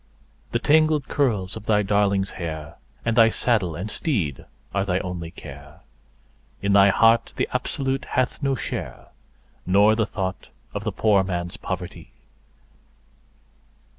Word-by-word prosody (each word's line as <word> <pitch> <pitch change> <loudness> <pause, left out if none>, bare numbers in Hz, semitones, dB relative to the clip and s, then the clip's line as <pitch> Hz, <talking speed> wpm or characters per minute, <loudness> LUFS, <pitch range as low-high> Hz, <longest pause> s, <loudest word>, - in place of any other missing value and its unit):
The - - +1
tangled 155 +2 +3
curls 105 -10 0
of 110 -1 -9
thy 105 -1 +3
darling's 100 -1 +1
hair, 80 -3 -6 0.3
and 115 -1 +1
thy 115 -1 +7
saddle 110 -9 +1
and 90 +6 -4
teed 100 - -2 0.3
are 100 - +1
thy 90 -2 0
only 90 -3 -4
care; - - -12 0.8
In 100 0 0
thy 100 0 +7
heart 115 +3 +3
the - - 0
Absolute 135 +1 -2
hath 130 +2 -1
no 135 -1 +1
share, 115 - -6 0.5
nor 100 +4 +4
the 110 -1 0
thought 95 -5 -4 0.3
of 105 - -4
the 110 - 0
poor 100 0 +3
man's 90 -2 -3
poverty. 90 -1 -6
100 Hz, 135 wpm, -23 LUFS, 95-115 Hz, 0.8 s, thy